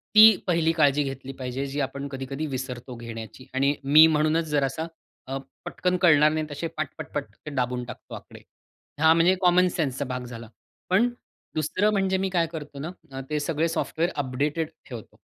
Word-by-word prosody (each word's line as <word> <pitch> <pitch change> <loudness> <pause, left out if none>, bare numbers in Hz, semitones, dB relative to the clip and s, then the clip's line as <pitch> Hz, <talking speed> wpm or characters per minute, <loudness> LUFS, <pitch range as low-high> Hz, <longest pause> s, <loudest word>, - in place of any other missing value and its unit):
ती 215 -1 +10
पहिली 165 -2 +3
काळजी 145 -3 +3
घेतली 135 -1 -6
पाहिजे 130 +1 -3
जी 140 +2 -4
आपण 140 +1 -3
कधी-कधी 135 +2 -5
विसरतो 130 -2 -5
घेण्याची 115 +1 -8
आणि 140 +2 +2
मी 150 +3 +8
म्हणूनच 155 +1 +2
जरासा 145 +2 0 0.4
अ, 135 +1 -3 0.3
पटकन 180 0 -1
कळणार 155 -4 +6
नाही 155 0 -1
तसे 145 +3 -3
पट, 155 -2 -1
पटपट 145 -2 -4 0.2
ते 150 - -5
दाबून 125 -1 -1
टाकतो - - -10
आकडे. - - -12 0.6
हा. 160 0 +7
म्हणजे 170 +3 +4
कॉमनसेन्सचा 175 -7 +2
भाग 125 -1 -4
झाला. 115 -2 -9 0.4
पण 205 +7 +4 0.5
दुसरं 185 +7 +1
म्हणजे 190 -2 +1
मी 190 0 -1
काय 170 -3 +1
करतो 150 -3 -7
ना, 160 +5 -4 0.4
ते 150 - 0
सगळे 160 +2 0
सॉफ्टवेअर 165 +1 -1
अपडेटेड 145 +4 -1 0.2
ठेवतो. 120 -4 -9
150 Hz, 165 wpm, -25 LUFS, 135-165 Hz, 0.6 s, ती